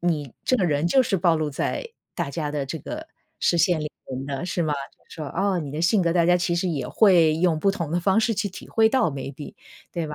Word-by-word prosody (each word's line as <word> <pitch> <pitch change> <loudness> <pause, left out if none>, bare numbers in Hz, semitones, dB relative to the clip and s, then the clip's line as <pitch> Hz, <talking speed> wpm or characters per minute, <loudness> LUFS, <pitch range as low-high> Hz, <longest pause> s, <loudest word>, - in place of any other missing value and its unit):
你 150 -7 -1
这 - - +2
个 190 - +2
人 150 0 +1
就 260 +10 +4
是 215 -5 0
暴 170 -1 +3
露 155 -1 -1
在 150 - -3 0.3
大 170 -6 -3
家 150 0 -3
的 145 -2 -2
这 160 +4 -4
个 - - -7 0.3
视 - - +2
线 170 -1 +3
里 150 0 -4 0.2
面 135 +1 -5
的， 140 +3 -4
是 175 -1 -1
吗？ 150 -2 0 0.3
就 160 - -8
说 - - -4
哦， 190 +5 0
你 150 -1 -4
性 185 +4 +3
格 170 -1 +1
大 170 -2 +3
家 180 0 +5
其 175 -1 0
实 175 +2 0
也 140 -7 -2
会 175 -7 +5
用 170 -2 +2
不 195 +5 +2
同 170 -5 -4
的 175 - +1
方 195 +4 +2
式 225 0 +1
去 205 - -1
体 185 - -11
会 225 -1 +3
到， 250 - +2
maybe， 140 +1 -7 0.4
对 170 -2 -3
吧。 150 - -6
170 Hz, 295 characters per minute, -24 LUFS, 150-185 Hz, 0.4 s, 家